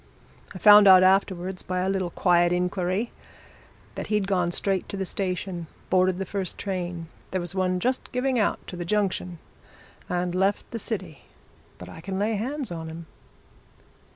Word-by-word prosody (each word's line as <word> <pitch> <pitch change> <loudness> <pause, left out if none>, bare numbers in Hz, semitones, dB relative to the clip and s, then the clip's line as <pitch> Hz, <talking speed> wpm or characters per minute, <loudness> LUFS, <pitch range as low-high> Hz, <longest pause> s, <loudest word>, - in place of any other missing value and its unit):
I - - -4
found 205 +1 +8
out 185 -1 +9
afterwards, 185 -1 +1
by 185 0 -2
a 185 - 0
little 190 -2 -1
quiet 175 -1 +3
inquiry, 180 +4 -1 0.8
that - - -6
he'd 210 -2 +1
gone 180 -3 +1
straight 190 +1 -1
to 200 - -5
the 190 - -2
station, 180 -2 -3 0.2
boarded 185 0 +3
the 195 - -3
first 190 -1 -3
train 175 -4 -4 0.2
there 185 - -1
was 175 0 -4
one 185 -1 0
just 255 +7 -1
giving 250 0 0
out, 210 - +1
to - - -8
the 175 - -4
junction 185 -2 -1 0.7
and 180 0 -1
left 195 +2 0
the 230 - -4
city. 190 -9 -5 0.5
But 90 - -10
I 95 - -10
can 190 +2 -4
lay 210 +3 0
hands 255 +3 -3
on 165 -1 -5
him!" 165 +1 -8
185 Hz, 170 wpm, -25 LUFS, 175-200 Hz, 0.8 s, out